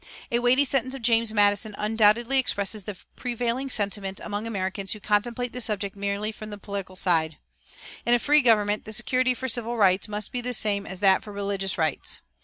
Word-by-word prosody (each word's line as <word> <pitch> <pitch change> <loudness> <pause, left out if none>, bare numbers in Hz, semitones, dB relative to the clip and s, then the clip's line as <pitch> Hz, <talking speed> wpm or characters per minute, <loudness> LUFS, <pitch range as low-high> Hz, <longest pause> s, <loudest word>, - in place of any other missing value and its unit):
A 235 - +2
weighty 250 +4 +3
sentence 260 0 0
of 265 - -9
James 230 -1 +3
Madison 205 0 +2
undoubtedly 225 +4 +3
expresses 205 -4 0
the 205 -3 -6 0.2
prevailing 245 +2 -2
sentiment 200 -4 -1
among 210 +1 -4
Americans 195 -2 -2
who 215 - -8
contemplate 235 +4 -1
the 250 - -5
subject 205 -3 -1
merely 200 +2 -2
from 215 0 -9
the 205 - -7
political 200 -2 -6
side: 160 -5 +1 0.7
"In 240 - +4
a - - +4
free 295 +5 +4
government 210 -4 +2
the 215 - -6
security 255 +2 +1
for 260 +2 -4
civil 240 0 -2
rights 190 -2 +3
must 210 -1 -3
be 250 - -3
the 250 0 -1
same 200 -2 +1
as 190 0 -5
that 195 -2 +4
for 210 - -9
religious 200 -1 -2
rights. 160 -4 -2
215 Hz, 195 wpm, -25 LUFS, 200-240 Hz, 0.7 s, In